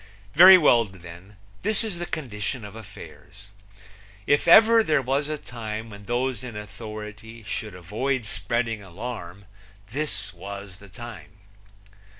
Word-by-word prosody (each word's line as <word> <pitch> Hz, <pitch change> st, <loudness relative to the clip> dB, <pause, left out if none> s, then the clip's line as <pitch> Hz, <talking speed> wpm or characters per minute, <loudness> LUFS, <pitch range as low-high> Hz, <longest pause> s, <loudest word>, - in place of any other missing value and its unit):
Very 185 Hz, +4 st, +10 dB
well, 125 Hz, -8 st, +5 dB
then, 90 Hz, +1 st, -13 dB, 0.3 s
this 215 Hz, +2 st, +1 dB
is 205 Hz, -6 st, -4 dB
the 175 Hz, -, -4 dB
condition 115 Hz, -3 st, -4 dB
of 105 Hz, +1 st, -10 dB
affairs. 100 Hz, -1 st, -13 dB, 0.8 s
If 145 Hz, -, +2 dB
ever 225 Hz, +1 st, +8 dB
there 155 Hz, -9 st, +2 dB
was 135 Hz, +3 st, -1 dB
a 155 Hz, -, -2 dB
time 110 Hz, -4 st, -7 dB
when 100 Hz, 0 st, -11 dB
those 125 Hz, +2 st, -1 dB
in 120 Hz, -4 st, -7 dB
authority 105 Hz, +1 st, -9 dB
should 105 Hz, -1 st, -5 dB
avoid 115 Hz, +8 st, -2 dB
spreading 115 Hz, +1 st, -2 dB
alarm 100 Hz, -1 st, -8 dB, 0.5 s
this 110 Hz, -8 st, -2 dB
was 100 Hz, +1 st, -9 dB
the 100 Hz, -, -14 dB
time. 120 Hz, +4 st, -10 dB
110 Hz, 135 wpm, -25 LUFS, 100-130 Hz, 0.8 s, Very